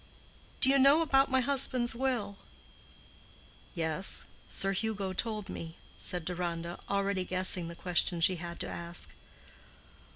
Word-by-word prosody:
Do 260 Hz, -, +6 dB
you 275 Hz, -, +4 dB
know 280 Hz, +5 st, +6 dB
about 270 Hz, -3 st, +3 dB
my 260 Hz, -1 st, +3 dB
husband's 255 Hz, -2 st, +3 dB
will?" 235 Hz, -5 st, -2 dB, 1.4 s
"Yes, 165 Hz, +3 st, +3 dB, 0.2 s
Sir 195 Hz, -, -1 dB
Hugo 200 Hz, -2 st, -2 dB
told 215 Hz, 0 st, -3 dB
me," 165 Hz, 0 st, -8 dB, 0.2 s
said 175 Hz, -2 st, 0 dB
Deronda, 170 Hz, -1 st, -4 dB
already 200 Hz, -1 st, 0 dB
guessing 185 Hz, -1 st, -1 dB
the 170 Hz, -, -8 dB
question 175 Hz, 0 st, +1 dB
she 180 Hz, +2 st, +3 dB
had 170 Hz, 0 st, -7 dB
to -, -, -3 dB
ask. 170 Hz, 0 st, -3 dB
190 Hz, 130 wpm, -31 LUFS, 175-240 Hz, 1.4 s, Do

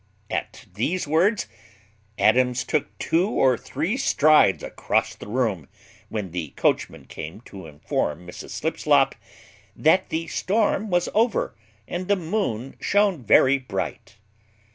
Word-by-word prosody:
At -, -, -4 dB
these 150 Hz, -, -1 dB
words 180 Hz, +8 st, +2 dB, 0.7 s
Adams 125 Hz, +3 st, +3 dB
took 155 Hz, -, -2 dB
two 175 Hz, +5 st, +1 dB
or 130 Hz, -, +3 dB
three 160 Hz, -, -3 dB
strides 155 Hz, -, +4 dB
across -, -, -1 dB
the -, -, -11 dB
room, 105 Hz, -, -1 dB, 0.4 s
when 105 Hz, -5 st, -4 dB
the 80 Hz, -5 st, -5 dB
coachman -, -, 0 dB
came 80 Hz, +8 st, -8 dB
to 95 Hz, -7 st, -11 dB
inform 75 Hz, +2 st, -3 dB
Mrs 90 Hz, -, -9 dB
Slipslop, -, -, +2 dB, 0.6 s
"That 185 Hz, +5 st, +3 dB
the 165 Hz, +1 st, -2 dB
storm 210 Hz, +2 st, 0 dB
was 175 Hz, -1 st, +1 dB
over, 225 Hz, +1 st, +1 dB, 0.3 s
and 180 Hz, +1 st, -4 dB
the 205 Hz, -, +3 dB
moon 160 Hz, -, -3 dB
shone 200 Hz, -8 st, +1 dB
very 130 Hz, +5 st, +5 dB
bright." 130 Hz, -, -5 dB
145 Hz, 125 wpm, -24 LUFS, -, 0.7 s, very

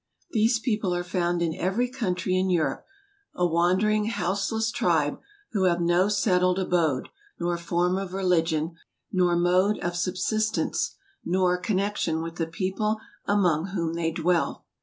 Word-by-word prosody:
These 225 Hz, +1 st, +3 dB
people 210 Hz, -6 st, -1 dB
are 175 Hz, -, -1 dB
found 175 Hz, -1 st, 0 dB
in 165 Hz, -1 st, 0 dB
every 195 Hz, +8 st, 0 dB
country 190 Hz, -7 st, -1 dB
in 185 Hz, 0 st, +1 dB
Europe; 170 Hz, -4 st, 0 dB, 0.5 s
a 180 Hz, -, +1 dB
wandering, 185 Hz, +5 st, +2 dB
houseless 220 Hz, +2 st, -1 dB
tribe, 160 Hz, -7 st, +1 dB, 0.3 s
who 195 Hz, -3 st, +1 dB
have 175 Hz, -1 st, +2 dB
no 175 Hz, +3 st, +3 dB
settled 185 Hz, -3 st, +2 dB
abode, 170 Hz, -8 st, 0 dB, 0.3 s
nor 175 Hz, 0 st, 0 dB
form 175 Hz, +2 st, 0 dB
of 195 Hz, -2 st, -5 dB
religion, 165 Hz, -4 st, +1 dB, 0.4 s
nor 180 Hz, -2 st, +2 dB
mode 180 Hz, +4 st, +3 dB
of 175 Hz, -, -3 dB
subsis¬ 195 Hz, +5 st, 0 dB
tence, -, -, -1 dB, 0.3 s
nor 180 Hz, 0 st, +2 dB
connexion 190 Hz, -5 st, -1 dB
with 165 Hz, +1 st, -7 dB
the 165 Hz, -, -1 dB
people 195 Hz, +5 st, -1 dB, 0.3 s
among 180 Hz, -5 st, +2 dB
whom 165 Hz, -3 st, -1 dB
they 165 Hz, -1 st, 0 dB
dwell. 170 Hz, +1 st, 0 dB
180 Hz, 145 wpm, -26 LUFS, 170-200 Hz, 0.5 s, These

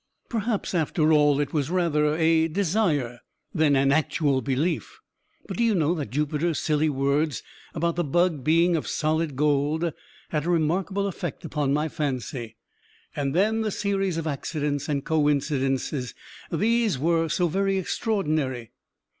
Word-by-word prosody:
Perhaps, 225 Hz, -3 st, -2 dB
after 160 Hz, -1 st, +2 dB
all, 145 Hz, -2 st, +4 dB
it 145 Hz, -1 st, -2 dB
was 150 Hz, -2 st, 0 dB
rather 155 Hz, -4 st, +1 dB
a 160 Hz, 0 st, +3 dB
desire 160 Hz, -, 0 dB, 0.3 s
than 155 Hz, -4 st, +3 dB
an 135 Hz, 0 st, +3 dB
actual 145 Hz, -2 st, +1 dB
belief; 140 Hz, +6 st, -2 dB, 0.5 s
but -, -, -5 dB
do 235 Hz, -, +2 dB
you 225 Hz, -3 st, +3 dB
know 165 Hz, -1 st, +2 dB
that 150 Hz, -10 st, -4 dB
Jupiter's 150 Hz, +4 st, -1 dB
silly 155 Hz, 0 st, +1 dB
words, 140 Hz, +2 st, 0 dB, 0.3 s
about 170 Hz, +1 st, -1 dB
the 175 Hz, -, +1 dB
bug 165 Hz, -1 st, +1 dB
being 170 Hz, +4 st, +3 dB
of 155 Hz, -, -2 dB
solid 155 Hz, -1 st, -1 dB
gold, 150 Hz, +3 st, +1 dB, 0.4 s
had 150 Hz, -1 st, -1 dB
a -, -, 0 dB
remarkable 180 Hz, +4 st, 0 dB
effect 175 Hz, -5 st, -5 dB
upon 145 Hz, -3 st, -1 dB
my 150 Hz, +2 st, +1 dB
fancy? 130 Hz, -6 st, -4 dB, 0.6 s
And 140 Hz, 0 st, -2 dB
then 215 Hz, +5 st, +2 dB
the 220 Hz, -, 0 dB
series 195 Hz, -3 st, -1 dB
of 165 Hz, -, -3 dB
accidents 145 Hz, -1 st, -2 dB
and 140 Hz, -2 st, -1 dB
coincidents 145 Hz, -4 st, +1 dB, 0.6 s
these 220 Hz, -, +1 dB
were 165 Hz, +3 st, +1 dB
so 175 Hz, +2 st, +1 dB
very 195 Hz, +3 st, 0 dB
extraordinary. 155 Hz, -, -1 dB
155 Hz, 145 wpm, -25 LUFS, 145-175 Hz, 0.6 s, all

